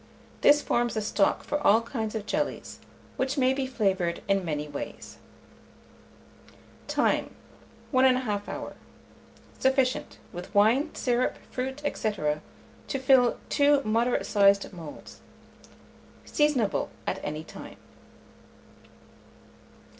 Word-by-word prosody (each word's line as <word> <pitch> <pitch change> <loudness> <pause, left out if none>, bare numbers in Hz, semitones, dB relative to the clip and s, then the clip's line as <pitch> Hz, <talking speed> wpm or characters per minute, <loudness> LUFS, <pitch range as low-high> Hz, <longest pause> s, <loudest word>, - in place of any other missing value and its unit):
This 295 0 +6
forms 240 -2 0
a - - +1
stock 205 -1 +1
for 295 - -2
all 220 -6 +5
kinds 225 -2 -4
of 215 -2 -3
jellies, 295 +7 -3 0.4
which 265 +2 -1
may 260 -1 +3
be 265 -1 -2
flavoured 190 -8 0
in 195 -1 +2
many 150 -3 -3
ways. 145 -1 -7 1.7
Time. - - 0 0.6
1 260 -2 +4
1/2 245 -6 +1
hour. - - -6 0.9
Sufficient, 265 -1 +1 0.2
with 180 +3 -8
wine, 235 +9 +4
syrup, 245 0 0
fruit, 265 +3 -4
&c., 220 - -1
to 150 - -5
fill 260 -2 +4
two 285 -1 +4
moderate 230 +3 +1
sized 200 -1 +3
moulds. 165 -4 -10 1.0
Seasonable 290 -9 +1 0.2
at - - -2
any 155 +1 -4
time. - - -11
230 Hz, 110 wpm, -27 LUFS, 200-265 Hz, 1.7 s, This